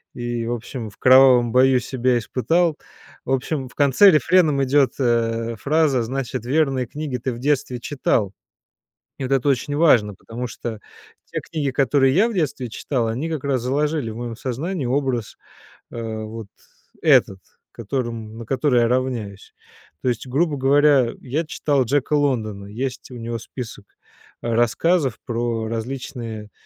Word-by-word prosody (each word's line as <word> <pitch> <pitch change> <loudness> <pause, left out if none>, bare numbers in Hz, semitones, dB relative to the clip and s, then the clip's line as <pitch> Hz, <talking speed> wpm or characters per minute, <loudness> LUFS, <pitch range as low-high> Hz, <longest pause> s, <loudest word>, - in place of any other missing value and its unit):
и, 120 -1 -3
в 120 - -1
общем, 120 -1 -6
в 100 - -19
кровавом 130 -2 +6
бою 130 +1 +4
себя 125 0 0
испытал. 160 +8 0 0.5
В 130 - -3
общем, 135 +1 -1
в - - -20
конце 145 +8 +6
рефреном 155 -3 +3
идёт, 135 0 +3
э, 115 -2 0
фраза 145 -3 +2
"значит 130 -1 -4
верные 135 -2 +1
книги 145 -3 -4
ты 125 +2 -3
в 115 - -8
детстве 130 -2 0
читал". 120 -8 -1 0.9
И - - -5
вот 135 - -3
это 135 +1 +2
очень 140 +2 0
важно, 115 -11 +4
потому 120 +6 -6
что 115 -2 -6 0.5
те - - -4
книги, 145 -4 -3
которые 135 0 +3
я 205 +7 +4
в 230 - -5
детстве 140 -7 -1
читал, 120 +1 -2
они 125 +9 -2
как 155 -4 -3
раз 135 -4 0
заложили 145 -1 -1
в 110 - -8
моём 120 -1 -5
сознании 140 - -3
образ, 130 -3 -1 0.6
а, 110 -2 -5
вот 110 -1 -8 0.5
этот, 95 - +4 0.3
которым 115 -1 -4
на 115 - -7
который 135 -1 +2
я 115 - +3
равняюсь. 120 -6 -3 0.5
То - - 0
есть, 120 +1 -2
грубо 145 +3 0
говоря, 140 -2 +4
я 145 +6 -2
читал 140 -4 0
Джека 145 +4 0
Лондона. 110 -9 0
Есть 125 +5 -5
у 125 - -9
него 115 0 -4
список, 115 -4 -8 0.6
а, 115 -1 -1
рассказов 130 - +2
про 115 -1 -2
различные, 115 -2 -5
125 Hz, 155 wpm, -22 LUFS, 115-140 Hz, 0.9 s, кровавом